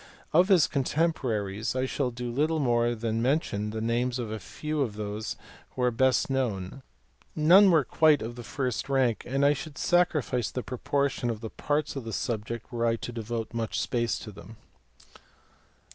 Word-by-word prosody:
Of 175 +4 +5
his 185 -6 +5
contemporaries 125 -8 -1
I 130 0 +1
shall 130 0 -1
do 120 0 -5
little 155 +6 +1
more 120 -4 +2
than 115 0 -2
mention 120 -6 0
the 110 +1 -4
names 120 +2 0
of 115 -4 -4
a 110 - -4
few 150 - -4
of 115 -7 -1
those 105 +1 -4 0.4
who 125 - -1
are 125 - +3
best 130 +2 +2
known; 125 -4 -2 0.5
none 180 +6 +7
were 160 -5 +5
quite 155 0 +3
of 115 +2 -5
the 120 - -7
first 130 +2 -3
rank 130 -5 +1
and 135 +2 +1
I 145 - +5
should 150 0 -7
sacrifice 150 -9 +1
the 125 - -4
proportion 135 0 -1
of 115 -2 -3
the 110 - -6
parts 150 +1 -1
of 135 - -4
the 115 -1 -6
subject 115 +2 -3
were 120 -1 0
I 115 - +2
to 120 - -6
devote 115 -1 -4
much 115 -1 -2
space 120 -2 0
to 105 - -8
them. 105 +3 -13
125 Hz, 180 wpm, -28 LUFS, 115-140 Hz, 0.5 s, none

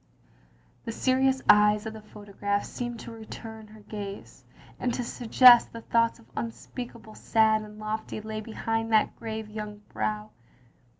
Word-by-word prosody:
" - - -33
^ - - -37
The 230 - -3
serious 265 +2 +2
eyes 210 +1 +6
of 220 - -4
the 220 - -9
photograph 205 -1 -3
seemed 240 -1 -5
to - - -8
return 220 0 -9
her 215 0 -15
gaze, 205 -1 -8 0.4
and 245 - 0
to 250 - -2
suggest 240 +1 +6
that 230 -1 -11
thoughts 230 0 +3 0.2
unspeakably 235 -1 -7
sad 220 -1 +3
and 210 0 -11
lofty 215 0 -4
lay 215 0 -5
behind 225 +1 -2
that 215 -1 +3
grave 220 -1 -5
young 210 -1 -7
brow. 215 0 -3
220 Hz, 155 wpm, -27 LUFS, 210-230 Hz, 0.4 s, eyes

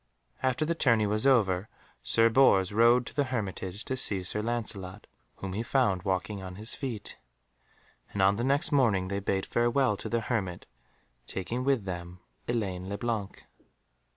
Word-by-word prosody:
After 130 +3 +1
the 170 - 0
tourney 115 -9 +3
was 105 +5 +2
over, 100 -6 +3 0.3
Sir 115 0 +3
Bors 110 -6 +4
rode 120 +3 +4
to - - -8
the 145 -1 +1
hermitage 105 -4 -4
to 130 - -2
see 100 -7 +1
Sir 105 +4 -1
Lancelot, 105 -4 -3 0.3
whom 95 -1 -6
he 105 - -2
found 115 -6 +1
walking 95 +1 -2
on 95 -1 -7
his 110 +4 -4
feet, 120 -7 -5 0.9
and 100 - -5
on 95 +1 +4
the 120 - -1
next 140 +3 +1
morning 110 -10 +2
they 100 0 -1
bade 95 -1 -1
farewell 120 -1 +2
to - - -6
the 115 0 0
hermit, 100 -7 -3 0.6
taking 115 +7 -3
with 135 -6 +1
them 90 -1 -6 0.3
Elaine 95 -6 -2
le 100 - -3
Blanc. 110 -4 -3
105 Hz, 165 wpm, -29 LUFS, 95-120 Hz, 0.9 s, Bors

